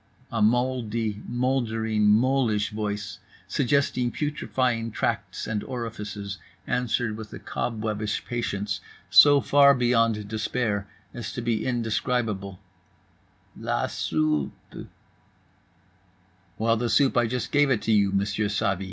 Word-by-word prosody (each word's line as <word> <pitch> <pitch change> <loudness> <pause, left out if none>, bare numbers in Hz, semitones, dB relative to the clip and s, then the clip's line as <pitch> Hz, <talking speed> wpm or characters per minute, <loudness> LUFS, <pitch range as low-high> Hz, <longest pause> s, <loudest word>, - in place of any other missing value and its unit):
A - - -1
moldly 115 -2 0
moldering 115 -4 0
molish 115 -1 +2
voice, 105 -2 -4 0.3
suggesting 130 -2 +1
putrefying 130 -6 -1
tracts - - -2
and 110 -1 -2
orifices, 105 -4 -5 0.3
answers 120 -2 -1
with 110 -1 -9
a - - -6
cob 115 -2 -4
webbish 105 -1 -2
patience 105 -4 -3 0.3
so 145 -1 +8
far 140 -1 +6
beyond 115 -4 +2
despair 110 -1 -2 0.3
as 120 - -5
to 120 - -4
be 115 -2 0
indescribable: 115 -5 -1 1.0
"La - - -1
soupe." 75 -2 -2 1.7
"Well, 115 +1 +2
the 120 +1 -1
soup, 140 +1 +3
I 120 -1 +3
just 125 0 -3
gave 145 -1 +4
it 120 -5 +1
to - - 0
you, 100 -2 +4
Monsieur 100 +2 0
Savy." 100 -2 0
115 Hz, 115 wpm, -26 LUFS, 105-125 Hz, 1.7 s, so